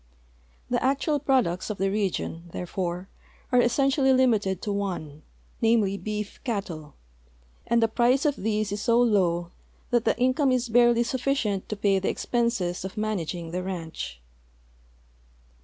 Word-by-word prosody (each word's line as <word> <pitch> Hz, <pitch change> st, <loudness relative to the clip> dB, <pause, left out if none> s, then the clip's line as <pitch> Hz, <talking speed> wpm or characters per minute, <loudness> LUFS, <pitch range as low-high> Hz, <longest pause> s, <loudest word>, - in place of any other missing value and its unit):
The 245 Hz, -, +1 dB
actual 280 Hz, +3 st, +1 dB
i)roducts 255 Hz, -11 st, +1 dB
of 210 Hz, -, -3 dB
the 195 Hz, +1 st, 0 dB
region, 185 Hz, -4 st, -2 dB
therefore, 180 Hz, 0 st, -3 dB, 0.4 s
are 250 Hz, -1 st, +5 dB
essential!}'' 265 Hz, +2 st, +3 dB
limited 215 Hz, -8 st, +2 dB
to 210 Hz, -, -2 dB
one, 175 Hz, -7 st, -4 dB, 0.4 s
namely, 225 Hz, -4 st, +3 dB
beef 210 Hz, 0 st, -5 dB
cattle, 175 Hz, -, -4 dB, 0.7 s
and 235 Hz, 0 st, +3 dB
the -, -, +4 dB
price 245 Hz, +5 st, +2 dB
of 290 Hz, -2 st, +2 dB
these 215 Hz, -1 st, -1 dB
is 205 Hz, 0 st, -3 dB
so 235 Hz, 0 st, +3 dB
low 180 Hz, -7 st, +2 dB, 0.4 s
that 240 Hz, -2 st, +3 dB
the -, -, +2 dB
income 255 Hz, +2 st, +2 dB
is 250 Hz, -1 st, 0 dB
barely 240 Hz, 0 st, +5 dB
sufficient 240 Hz, -5 st, -1 dB
to 215 Hz, -, -2 dB
pay 200 Hz, -1 st, +2 dB
the 190 Hz, -, -1 dB
expenses 235 Hz, -8 st, -1 dB
of 190 Hz, +3 st, -7 dB
managing 175 Hz, -6 st, -3 dB
the 180 Hz, +1 st, -2 dB
ranch. 165 Hz, -, -5 dB
210 Hz, 140 wpm, -26 LUFS, 185-245 Hz, 0.7 s, are